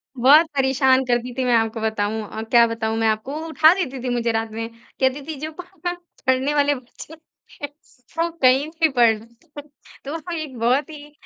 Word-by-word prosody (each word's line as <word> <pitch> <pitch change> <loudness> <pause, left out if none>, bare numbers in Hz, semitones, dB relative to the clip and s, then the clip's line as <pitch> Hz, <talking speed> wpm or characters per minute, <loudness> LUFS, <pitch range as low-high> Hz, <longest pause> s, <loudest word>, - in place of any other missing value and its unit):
बहुत 280 +6 +6
परेशान 265 -1 +3
करती 245 0 -1
थी 260 - 0
मैं 245 - +2
आपको 225 0 0
बताऊँ 220 0 -1
अ, 220 - -5
क्या 235 +1 +4
बताऊँ 225 -1 -3
मैं 225 0 +1
आपको, 220 +5 -1
वो 325 - -6
उठा 320 +1 +5
देती 280 -9 -4
थी 250 - -2
मुझे 235 -1 0
रात 225 0 -2
में 225 +1 -4 0.3
कहती 265 +2 +1
थी। 315 - -4
जो 310 +1 -5
पह 360 -1 -5 0.4
पढ़ने 260 +3 +2
वाले 290 0 +2
बच्चे 255 +4 -12 0.5
है - - -1 0.5
वो 335 +1 +1
कहीं 260 +3 +4
भी 325 0 +1
पढ़ 245 -4 +4
लेंते 230 +2 -20
है। 295 - -12 0.4
तो 325 +4 -6
एक 300 -6 -6
बहुत 255 +7 +1
ही 295 -1 -11
260 Hz, 195 wpm, -21 LUFS, 230-300 Hz, 0.5 s, बहुत